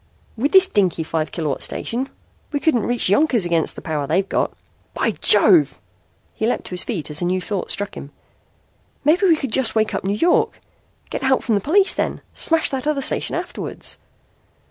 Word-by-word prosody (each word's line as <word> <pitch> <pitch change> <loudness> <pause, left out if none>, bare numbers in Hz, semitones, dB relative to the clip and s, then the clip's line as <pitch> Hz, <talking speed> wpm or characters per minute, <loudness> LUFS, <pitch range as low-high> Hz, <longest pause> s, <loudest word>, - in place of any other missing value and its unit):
"With 260 +6 -1
this 380 -1 +6
dinky, 185 - 0
five 160 -1 -3
kilowatt 155 -5 -3
station? 255 +4 -3 0.4
We 290 - -1
couldn't 280 -8 +1
reach 245 0 +4
Yonkers 230 - +2
against 170 -2 +1
the - - -10
power 150 -3 -3
they've 185 +6 0
got. - - -1 0.4
By - - 0
Jove!" 330 -5 +5 0.6
He 220 - -2
leaped 245 - -1
to - - -10
his 180 - 0
feet 175 -11 -4
as 150 - -1
a - - 0
new 185 +1 0
thought 195 +1 -4
struck 205 0 -3
him. 140 - -9 1.0
"Maybe 350 +6 +3
we 335 - +5
could 275 -6 -5
just 250 -1 +2
wake 220 -1 +1
up - - -3
New 200 +2 -1
York. 345 +9 +1 0.5
Get - - -4
help 265 -1 +1
from 230 - 0
the 200 - +1
police 380 - +3
then! - - -3
Smash 325 -1 +2
that 270 +1 -4
other 290 -3 0
station - - -1
afterwards!" - - -6
225 Hz, 190 wpm, -20 LUFS, 180-290 Hz, 1.0 s, this